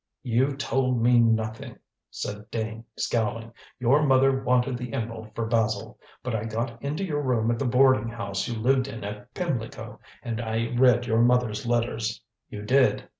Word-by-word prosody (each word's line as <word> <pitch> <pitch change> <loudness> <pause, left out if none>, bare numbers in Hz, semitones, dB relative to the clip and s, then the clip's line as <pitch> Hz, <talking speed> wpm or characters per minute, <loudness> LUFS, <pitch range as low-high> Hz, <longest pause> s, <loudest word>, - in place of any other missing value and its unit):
"You 130 +3 +1
told 130 -3 0
me 120 +1 +5
nothing," 110 -1 0 0.3
said 105 +1 -6
Dane, 110 0 -4
scowling. 115 0 -1 0.2
"Your 130 +4 +3
mother 135 -1 +3
wanted 125 0 +2
the 125 +1 -6
emerald 110 -3 -5
for 115 - -1
Basil. 110 -2 -1 0.2
But 125 - -3
I 110 -1 -2
got 115 +1 -4
into 150 +7 -3
your 150 -5 -1
room 120 -4 +1
at 115 - -2
the 140 - -1
boarding 125 -2 +4
house 115 -4 -3
you 120 - -3
lived 130 +3 +2
in 115 -5 -7
at 105 0 -7
Pimlico, 135 -11 -4 0.2
and 115 -1 -3
I 115 +1 -2
read 120 -1 +4
your 115 -1 +2
mother's 120 -2 +2
letters." 115 -2 -1 0.3
"You 105 -1 -7
did." 130 +5 +2
120 Hz, 170 wpm, -26 LUFS, 110-130 Hz, 0.3 s, me